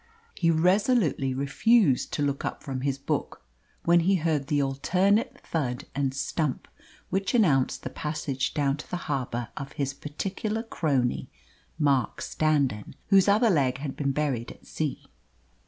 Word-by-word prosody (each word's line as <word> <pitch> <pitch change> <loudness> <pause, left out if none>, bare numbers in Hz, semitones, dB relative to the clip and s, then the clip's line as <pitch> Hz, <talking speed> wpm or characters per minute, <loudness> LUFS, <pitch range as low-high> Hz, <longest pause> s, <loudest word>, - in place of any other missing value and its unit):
He 165 - +1
resolutely 180 - +2
refused 140 - +3
to 145 - 0
look 140 -1 -1
up - - -4
from 130 -2 -4
his 135 0 -1
book 140 - -3 0.4
when 170 0 +5
he 190 +4 +3
heard 155 -5 0
the 145 -1 +1
alternate 185 +10 +1
thud 125 -6 -2
and 140 -1 0
stump 140 +1 -2 0.4
which 195 +3 0
announced 145 - +2
the 130 - -5
passage 145 -3 -3
down 140 -2 +1
to - - -10
the 180 - -2
harbour 120 -4 -2
of 140 +1 -7
his 135 -1 -2
particular 195 +10 -4
crony, 140 - -1 0.5
Mark 140 -5 +1
Standon, 140 -9 0
whose 195 -1 +6
other 215 +3 +4
leg 135 -7 +2
had 135 -1 -5
been 140 -2 0
buried 135 -5 -1
at - - -16
sea. 155 -3 -3
145 Hz, 150 wpm, -27 LUFS, 135-180 Hz, 0.5 s, whose